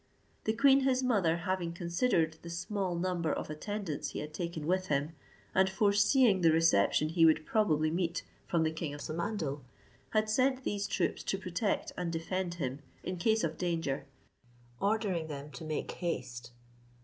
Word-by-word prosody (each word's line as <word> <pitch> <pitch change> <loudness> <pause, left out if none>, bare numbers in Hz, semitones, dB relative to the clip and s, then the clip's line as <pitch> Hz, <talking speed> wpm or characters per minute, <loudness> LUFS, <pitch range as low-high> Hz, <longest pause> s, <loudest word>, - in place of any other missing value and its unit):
The 220 - +2
queen 270 +4 +6
his 265 -1 +2
mother 195 -10 +2
having 175 -1 -2
considered 170 -1 +1
the 170 - -8
small 180 +1 -2
number 170 -2 0
of - - -3
attendants 160 -2 -4
he - - -3
had 150 +1 -6
taken 170 -2 -4
with 185 +3 +1
him, 145 +1 0 0.4
and 190 0 +4
foreseeing 205 +2 +4
the 165 -2 +6
reception 155 -3 +3
he 165 +1 +2
would 155 -1 +5
probably 155 -8 +2
meet 170 0 -1 0.2
from 170 -2 +2
the 160 - +1
king 160 -2 -4
of 145 - -9
Samandal, 160 -4 -3 0.5
had 215 0 +1
sent 260 +4 +2
these 205 -2 -1
troops - - 0
to 195 - 0
protect 190 +2 -1
and 175 -2 -2
defend 175 +2 -2
him 135 -4 -3 0.2
in 185 0 -3
case 220 +5 +2
of 160 -1 -2
danger, 165 -6 -1 0.7
ordering 200 -6 0
them 145 -1 -7
to 125 - -9
make 155 -1 -3
haste. 125 -8 -4
170 Hz, 165 wpm, -32 LUFS, 155-200 Hz, 0.7 s, queen